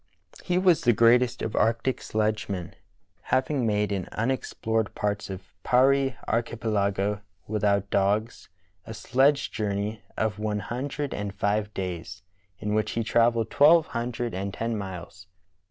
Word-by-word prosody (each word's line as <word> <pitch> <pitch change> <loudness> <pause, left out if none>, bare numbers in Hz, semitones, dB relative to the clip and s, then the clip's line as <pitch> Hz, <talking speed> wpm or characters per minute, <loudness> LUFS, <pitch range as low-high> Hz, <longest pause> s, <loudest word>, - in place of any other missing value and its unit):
He 180 0 0
was 180 -3 +4
the 120 - +4
greatest 120 +2 +4
of 110 - -3
arctic 115 +3 +1
sledgemen, 105 -4 -2 0.5
having 130 -2 0
made 105 -1 +1
in 95 -2 -2
unexplored 115 -2 -1
parts 105 -1 -2
of 95 0 -8
Parry 135 +1 +3
archipelago, 105 -3 0 0.2
without 100 -2 0
dogs, 105 +4 0 0.4
a 110 - -6
sledge 135 +6 +2
journey 105 0 -2 0.2
of 110 -2 -1
one 105 -1 -1
hundred 135 +7 -4
and 100 -1 -3
five 105 0 0
days, 90 0 -5 0.3
in 105 0 -3
which 110 0 0
he 115 - -1
travelled 115 0 +2
twelve 160 +3 +6
hundred 120 0 -2
and 95 +1 -4
ten 115 0 -2
miles. 95 -2 -7
110 Hz, 135 wpm, -26 LUFS, 100-120 Hz, 0.5 s, twelve